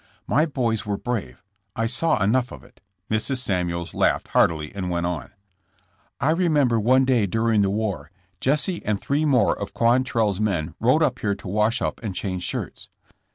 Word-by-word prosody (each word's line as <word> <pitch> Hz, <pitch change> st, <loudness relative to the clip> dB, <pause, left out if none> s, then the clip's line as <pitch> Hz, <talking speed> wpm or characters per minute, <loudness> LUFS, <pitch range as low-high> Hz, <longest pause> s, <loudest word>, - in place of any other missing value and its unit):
''My 155 Hz, +4 st, +2 dB
boys 115 Hz, -5 st, 0 dB
were 100 Hz, -1 st, -2 dB
brave. 100 Hz, -, -4 dB, 0.3 s
I 115 Hz, -, 0 dB
saw 135 Hz, -, +1 dB
enough 125 Hz, +5 st, +1 dB
of -, -, -10 dB
it." -, -, -21 dB, 0.3 s
Mrs. 110 Hz, +5 st, 0 dB
Samuels 90 Hz, -7 st, -2 dB
laughed -, -, +1 dB
heartily 75 Hz, -2 st, +1 dB
and 95 Hz, -2 st, -4 dB
went 85 Hz, 0 st, -1 dB
on: 85 Hz, -5 st, -3 dB, 0.9 s
"I 140 Hz, +3 st, +2 dB
re 175 Hz, +1 st, +1 dB
member 135 Hz, -7 st, +3 dB
one 130 Hz, +5 st, +4 dB
day 120 Hz, -6 st, +2 dB
during 110 Hz, +1 st, +1 dB
the 100 Hz, -, +2 dB
war, 105 Hz, -1 st, -2 dB, 0.3 s
Jesse 150 Hz, +6 st, 0 dB
and 105 Hz, -1 st, -1 dB
three 145 Hz, +3 st, 0 dB
more 125 Hz, -8 st, +3 dB
of 100 Hz, -, -7 dB
Quantrell's 115 Hz, -4 st, +2 dB
men 90 Hz, -7 st, -1 dB
rode 130 Hz, +8 st, +3 dB
up 130 Hz, -3 st, 0 dB
here 100 Hz, -1 st, 0 dB
to -, -, -11 dB
wash 105 Hz, +4 st, +1 dB
up -, -, -2 dB
and 105 Hz, -5 st, -4 dB
change 95 Hz, -2 st, -3 dB
shirts. -, -, -4 dB
110 Hz, 180 wpm, -23 LUFS, 100-130 Hz, 0.9 s, one